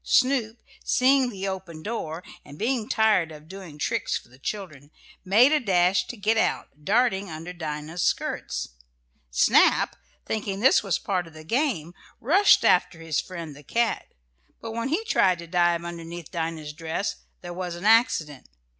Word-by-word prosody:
Snoop, 250 -4 +2 0.3
seeing 260 0 +3
the 195 -3 -5
open 180 -4 -6
door, 180 -7 -4 0.2
and 145 0 -13
being 230 +1 -1
tired 215 -7 +3
of 155 0 -12
doing 185 -5 -10
tricks - - -1
for - - -14
the 130 +2 -19
children, 155 -6 -6 0.3
made 220 +9 +5
a 305 - +4
dash 180 -4 +2
to 245 - -7
get 215 +2 +1
out, 150 -8 -1
darting 205 0 +2
under 165 +3 -7
Dinah's 155 0 -5
skirts. - - -1 0.6
Snap, - - +4 0.3
thinking 205 -3 -3
this 260 +5 +5
was 195 -5 0
part 180 -3 -2
of 165 - -15
the 155 0 -11
game, 200 - -1 0.3
rushed 370 - +5
after 165 - +3
his 165 -2 -1
friend 170 -5 -8
the 145 - -13
cat, 230 +9 -1 0.5
but 225 - -6
when 230 +3 -3
he 340 +10 0
tried 185 - +3
to 170 - -9
dive 175 0 +1
underneath 170 -1 -7
Dinah's 160 -2 -4
dress 165 +5 -3 0.2
there 175 -1 -7
was 180 -1 -4
an 175 +3 -8
accident. 165 - +3
180 Hz, 165 wpm, -25 LUFS, 160-220 Hz, 0.6 s, made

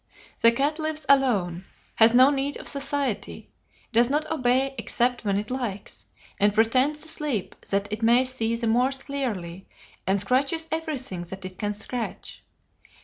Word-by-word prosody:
The 230 - +6
cat 285 +6 0
lives 310 -1 -3
alone, 200 -11 +2 0.3
has 225 0 +7
no 255 +3 +6
need 280 0 -1
of - - -5
society, 280 -4 -2 0.4
does 235 +2 +5
not 300 +2 +1
obey 265 -2 +1
except 245 0 0
when 200 -2 0
it 210 +3 -4
likes, 240 -6 -5 0.3
and 205 0 +3
pretends 255 +7 +2
to - - -10
sleep 295 - -3 0.2
that 200 +1 0
it 215 - -4
may 240 +3 +4
see 230 -3 -1
the 230 0 -3
more 245 +3 +3
clearly, 245 -11 -4 0.4
and 195 +1 +2
scratches 275 - 0
everything 290 - -3
that 190 +2 -9
it 185 0 -9
can 205 -1 -2
scratch. 230 +2 -6
245 Hz, 155 wpm, -25 LUFS, 210-275 Hz, 0.4 s, has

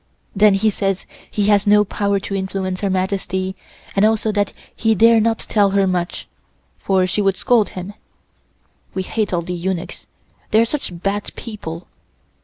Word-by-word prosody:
Then 205 0 +5
he 215 +2 +2
says 195 -1 -2 0.2
he 205 - 0
has 205 -1 +3
no 210 0 +6
power 200 0 0
to 200 - -5
influence 190 -1 -3
Her 200 - 0
Majesty, 190 0 -1 0.4
and 200 - +3
also 220 0 +2
that 205 -1 0 0.2
he 225 -1 +2
dare 230 +2 +6
not 225 +1 +2
tell 205 -2 +2
her 195 0 +2
much, 180 -2 -2 0.5
for 190 -1 +2
she 185 +3 0
would 195 -1 +1
scold 230 -5 +3
him. 185 +3 -6 1.0
We 190 - -1
hate 215 +2 -2
all 175 -2 0
the 180 - -4
eunuchs, 180 0 -4 0.4
they 215 - +4
are 230 - +5
such 205 - -5
bad 200 +1 -1
people. 180 -7 -7
195 Hz, 170 wpm, -20 LUFS, 185-210 Hz, 1.0 s, no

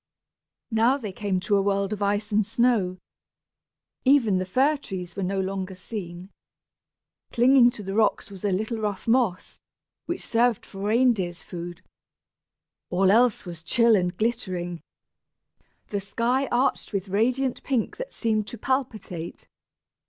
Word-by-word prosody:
Now 230 +5 +3
they 220 -8 -6
came 190 -1 -1
to 205 +2 +1
a - - +3
world 200 +1 0
of 210 - -6
ice 205 +1 0
and 210 +1 +3
snow. 220 -4 +1 1.1
Even 255 -8 +4
the 185 0 -2
fir 270 +10 +3
trees 185 -9 -7
were 200 - -3
no 195 +1 -1
longer 190 0 -3
seen. 185 -1 -7 1.0
Clinging 245 0 +6
to 220 -3 -7
the 195 0 -4
rocks 220 -1 +1
was 195 -1 -10
a 205 - +1
little 220 +4 -1
rough 210 -2 -3
moss, 230 -6 +1 0.5
which 345 - -3
served 235 -1 +2
for 195 - -11
reindeers' 210 -4 +1
food. 175 -1 -8 1.1
All 190 +1 +3
else 235 0 +3
was 170 -2 -8
chill 230 +7 +4
and 180 -2 0
glittering 185 -7 -2 1.1
the 205 -1 -2
sky 235 +7 0
arched 245 -2 0
with 195 -1 -2
radiant 250 +6 +1
pink 255 -5 -1
that - - -6
seemed 215 -3 -1
to 240 - -7
palpitate. 220 -9 -3
210 Hz, 145 wpm, -25 LUFS, 190-240 Hz, 1.1 s, Clinging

